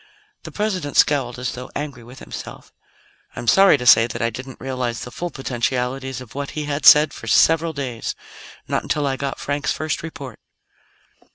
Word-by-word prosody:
The - - -10
President 185 -9 -2
scowled, 135 -5 +3
as 125 0 -3
though 125 0 -8
angry 145 -5 -5
with 125 +3 -13
himself. - - -9 0.6
"I'm 120 - -7
sorry 195 +2 +6
to 125 - -6
say 115 -1 +7
that 120 - -6
I 115 -1 0
didn't 130 +1 -9
realize 130 -3 -3
the 125 - -7
full 175 +6 -4
potentialities 130 -1 -3
of 125 - -12
what 140 0 -5
he 150 - -2
had 145 0 0
said 150 +1 +8
for - - -10
several 165 +1 +4
days 130 -6 -4 0.5
not - - 0
until 150 -1 -1
I 135 -1 0
got 135 0 -4
Frank's 145 +1 -2
first 155 -1 -3
report." 140 -7 -8
135 Hz, 180 wpm, -21 LUFS, 125-150 Hz, 0.6 s, said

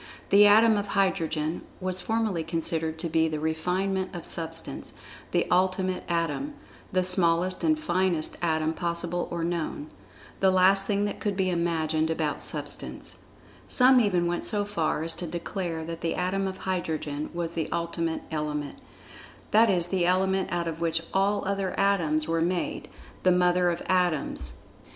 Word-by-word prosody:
The 205 +1 +8
atom 220 +1 +6
of 205 0 -2
Hydrogen 165 -5 0 0.2
was 185 -1 -3
formerly 220 -5 -1
considered 160 -1 -2
to 170 - -3
be 160 0 +2
the 155 -1 -3
refinement 185 +5 -1
of 170 - -6
Substance—the 165 0 -4
Ultimate 185 0 +1
Atom—the 185 - -3
smallest 180 0 +3
and 315 -1 +3
finest 185 - +1
Atom 160 -2 +1
possible 170 +1 -2
or 170 -1 -3
known—the 170 +2 -3
last 190 +1 +5
thing 205 -1 +1
that 205 - -4
could 205 -3 -2
be 185 -1 +1
imagined 160 -2 0
about 160 -2 -1
Substance. - - -5 0.5
Some 255 0 +6
even 185 -6 +2
went 175 0 -1
so 205 -2 0
far 165 -6 -1
as 165 - +1
to 175 - -4
declare 170 -1 -4
that 165 0 -6
the 165 - -1
Atom 195 +2 -1
of 190 0 -5
Hydrogen 155 -6 -3
was 170 -1 -3
the 165 -2 -3
Ultimate 170 -1 -2
Element, 150 -2 -3 0.7
that 225 +1 +5
is 180 -3 +2
the 175 -1 0
Element 190 +1 +1
out 170 -1 -1
of 165 0 -5
which 165 0 0
all 200 +2 +1
other 195 -1 -2
atoms 165 -6 +2
were 165 0 0
made—the[Pg 175 +1 -2 0.3
71] 185 -1 +4
mother 180 0 +3
of 170 0 -2
Atoms—the - - +1
Origin 175 -5 +1
of - - -8
Substance. 60 -1 -6
175 Hz, 160 wpm, -27 LUFS, 165-190 Hz, 0.7 s, The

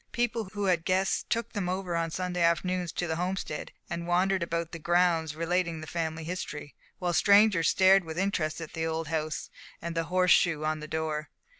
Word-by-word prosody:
People 235 -2 0
who 205 -1 -3
had 175 -3 +2
guests 190 +2 +1
took 230 0 -1
them 200 -4 -2
over 185 -1 -2
on 165 0 0
Sunday 180 +1 -3
afternoons 175 +1 +1
to 175 - -2
the 160 -1 -2
Homestead, 180 -3 -3 0.2
and 170 0 -4
wandered 185 +2 +2
about 170 -1 -2
the 165 - -7
grounds 170 -2 +2
relating 170 0 0
the 155 - -7
family 160 0 -3
history, 155 -4 -5 0.2
while 180 -1 -1
the - - +1
strangers 200 -4 +5
stared 190 0 +5
with 160 -1 -7
interest 175 -5 -1
at 160 - -8
the 160 0 -2
old 160 -1 -3
house, 155 -1 -3 0.3
and 170 0 -5
the 165 0 0
horse 180 +1 +2
shoe 155 -4 +4
on 155 0 0
the 155 - -7
door. 155 -1 -3
170 Hz, 200 wpm, -29 LUFS, 160-185 Hz, 0.3 s, strangers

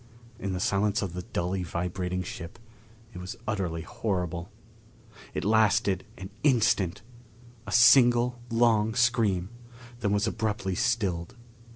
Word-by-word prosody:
In 100 -1 -3
the 90 - -3
silence 100 +3 +1
of 95 -3 -4
the 90 - -4
dully 90 -2 -3
vibrating 90 +1 -3
ship 85 -1 -8 0.6
it 90 - -8
was 90 +6 -6
utterly 90 -6 -2
horrible.... 90 -3 -3 0.9
It - - -2
lasted 105 -3 +2
an 95 +1 -8
instant 110 - +2 0.6
a - - -5
single 120 0 +5
long 115 -2 +2
scream; 115 -7 +2 0.5
then 100 -3 0
was 100 +1 +2
abruptly 110 -4 -2
stilled. 95 -7 -1
100 Hz, 120 wpm, -27 LUFS, 90-115 Hz, 0.9 s, single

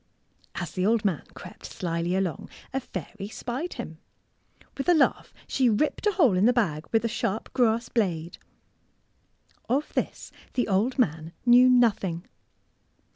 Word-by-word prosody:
As 175 -3 -4
the 185 - -2
old 220 +2 +2
man 185 -7 +1
crept - - -11
slyly 170 +1 -2
along, 185 -6 -2 0.2
a 270 - +1
fairy 195 - -7
spied 255 +10 -4
him. 160 -10 -7 0.8
With 275 +5 -2
a 350 - +6
laugh 295 - +2 0.2
she 260 -3 +2
ripped 295 - +1
a 415 - +3
hole 275 - +4
in 190 +5 +4
the - - +6
bag 160 -11 0
with 225 0 +2
a - - +3
sharp 220 -1 -3
grass 235 -2 +2
blade. 175 -7 -1 1.3
Of 275 +5 0
this - - -3 0.2
the 250 - +1
old 215 +6 +1
man 160 - 0
knew 250 +1 +7
nothing. 205 -8 +2
220 Hz, 150 wpm, -26 LUFS, 175-250 Hz, 1.3 s, knew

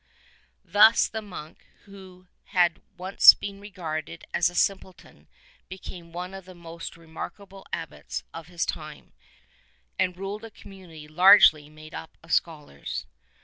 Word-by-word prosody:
Thus 205 +5 +6
the 220 - -5
monk 175 -7 -11 0.2
who 190 -2 -14 0.2
had 175 -3 +1 0.2
once 185 +2 +7
been 200 -1 -7
regarded 165 -5 -6
as 170 -1 +3
a 175 - -13
simple 190 -1 0
ton - - -20 0.4
became 180 -2 -10
one 180 +2 -6
of 195 -1 -9
the 185 -1 -13
most 170 0 -9
remarkable 190 +4 -10
Abbots 165 -2 -6
of 165 -1 -9
his 175 -1 -2
time, 155 -1 -7 0.9
and 180 -1 0
ruled 200 +3 -6
a 225 - -8
community 185 -7 -13
largely 155 -3 +6
made 155 +1 -14
up 160 - -9
of 165 - -5
scholars. 150 - -2
180 Hz, 140 wpm, -26 LUFS, 165-195 Hz, 0.9 s, once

